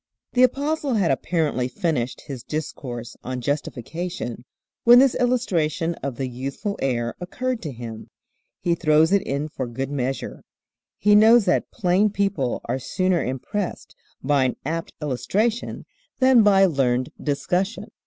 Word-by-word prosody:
THE 250 Hz, -, +3 dB
Apostle 280 Hz, +1 st, +2 dB
had 195 Hz, -8 st, +2 dB
apparently 150 Hz, -3 st, 0 dB
finished 130 Hz, -6 st, -2 dB
his 135 Hz, -4 st, -7 dB
discourse 125 Hz, -5 st, -5 dB
on 130 Hz, 0 st, -4 dB
justification 145 Hz, 0 st, -4 dB, 0.4 s
when 240 Hz, +1 st, +8 dB
this 265 Hz, 0 st, +6 dB
illustration 175 Hz, -, 0 dB
of 135 Hz, -3 st, -3 dB
the 130 Hz, +1 st, -3 dB
youthful 135 Hz, -, -4 dB
heir 120 Hz, -3 st, 0 dB
occurred 250 Hz, +7 st, -3 dB
to 155 Hz, -, -5 dB
him. 115 Hz, -3 st, -8 dB, 0.5 s
He 175 Hz, -, +1 dB
throws 160 Hz, 0 st, +3 dB
it 200 Hz, -1 st, +4 dB
in 140 Hz, 0 st, -2 dB
for 130 Hz, -4 st, -5 dB
good 135 Hz, +3 st, -4 dB
measure. 135 Hz, -1 st, -3 dB, 0.6 s
He 210 Hz, +1 st, +3 dB
knows 220 Hz, +1 st, +7 dB
that 180 Hz, -, +1 dB
plain 195 Hz, 0 st, +2 dB
people 195 Hz, -11 st, -1 dB
are 125 Hz, +3 st, -2 dB
sooner 185 Hz, +6 st, 0 dB
impressed 170 Hz, -, -4 dB, 0.3 s
by 140 Hz, -1 st, +3 dB
an 125 Hz, -, 0 dB
apt 165 Hz, +3 st, -3 dB
illustration 210 Hz, -, -1 dB, 0.3 s
than 260 Hz, -2 st, +6 dB
by 195 Hz, -2 st, +6 dB
learned 130 Hz, -6 st, +1 dB
discussion. 180 Hz, +8 st, -1 dB
160 Hz, 140 wpm, -23 LUFS, 130-205 Hz, 0.6 s, when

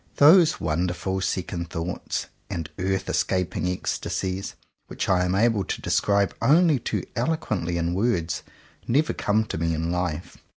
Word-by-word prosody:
Those 160 Hz, +2 st, +6 dB
wonderful 90 Hz, +4 st, -1 dB
second 90 Hz, -2 st, -2 dB
thoughts 85 Hz, +1 st, -3 dB, 0.2 s
and 80 Hz, -3 st, -3 dB
earth 95 Hz, +1 st, 0 dB
escap 90 Hz, 0 st, 0 dB
ing -, -, -1 dB
ecstasies, 95 Hz, +1 st, -3 dB, 0.3 s
which -, -, -4 dB
I 90 Hz, -1 st, +3 dB
am 90 Hz, +1 st, 0 dB
able 110 Hz, -1 st, +3 dB
to -, -, -3 dB
describe 100 Hz, -2 st, +1 dB
only 150 Hz, +3 st, +5 dB
too 120 Hz, -, -2 dB
eloquently 110 Hz, -, -1 dB
in 85 Hz, 0 st, 0 dB
words, 90 Hz, -5 st, 0 dB, 0.5 s
never 145 Hz, +6 st, +2 dB
come 110 Hz, +2 st, +1 dB
to 80 Hz, -, -4 dB
me 80 Hz, 0 st, 0 dB
in 80 Hz, +2 st, -2 dB
life. 90 Hz, -1 st, -3 dB
95 Hz, 145 wpm, -25 LUFS, 85-110 Hz, 0.5 s, Those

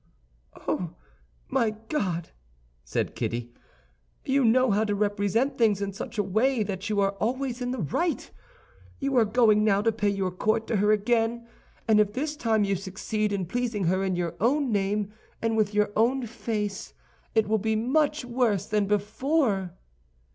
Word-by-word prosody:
"Oh, 170 Hz, -3 st, -2 dB, 0.5 s
my 215 Hz, -, +1 dB
God!" 180 Hz, -, -2 dB, 0.5 s
said -, -, -2 dB
Kitty, 120 Hz, 0 st, -3 dB, 0.7 s
"you 275 Hz, 0 st, +2 dB
know 250 Hz, +1 st, +4 dB
how 205 Hz, +2 st, +2 dB
to 205 Hz, -2 st, 0 dB
represent 205 Hz, +6 st, 0 dB
things 215 Hz, -4 st, +3 dB
in 200 Hz, -1 st, -3 dB
such 225 Hz, +3 st, -7 dB
a 205 Hz, -, +2 dB
way 220 Hz, +5 st, +1 dB
that 195 Hz, 0 st, -4 dB
you 210 Hz, -1 st, +1 dB
are 195 Hz, 0 st, +2 dB
always 255 Hz, +2 st, -1 dB
in 245 Hz, -, -1 dB
the 255 Hz, -, -2 dB
right. 330 Hz, -, -1 dB, 0.7 s
You 275 Hz, -1 st, -1 dB
are 230 Hz, -, +5 dB
going 215 Hz, -1 st, +4 dB
now 205 Hz, -1 st, +3 dB
to 225 Hz, -, +3 dB
pay 210 Hz, -2 st, 0 dB
your 195 Hz, -2 st, -1 dB
court 215 Hz, +4 st, 0 dB
to 225 Hz, -, +1 dB
her 210 Hz, +2 st, +3 dB
again, 230 Hz, +2 st, +1 dB, 0.4 s
and 215 Hz, -1 st, +5 dB
if 210 Hz, -1 st, +2 dB
this 295 Hz, +4 st, -2 dB
time 225 Hz, -6 st, +1 dB
you 200 Hz, -1 st, +1 dB
succeed 205 Hz, +3 st, -2 dB
in 195 Hz, -2 st, -1 dB
pleasing 230 Hz, +1 st, -2 dB
her 185 Hz, +3 st, +1 dB
in 190 Hz, -1 st, 0 dB
your 175 Hz, -2 st, -2 dB
own 265 Hz, +4 st, +2 dB
name 205 Hz, 0 st, 0 dB, 0.3 s
and 225 Hz, 0 st, 0 dB
with 215 Hz, -2 st, +2 dB
your 210 Hz, 0 st, +2 dB
own 245 Hz, +3 st, +2 dB
face, 210 Hz, -3 st, -4 dB, 0.4 s
it 220 Hz, -2 st, +3 dB
will 220 Hz, +1 st, +2 dB
be 220 Hz, +2 st, 0 dB
much 285 Hz, +5 st, +1 dB
worse 235 Hz, -6 st, +1 dB
than 210 Hz, -1 st, 0 dB
before." 210 Hz, -, 0 dB
215 Hz, 170 wpm, -27 LUFS, 200-240 Hz, 0.7 s, are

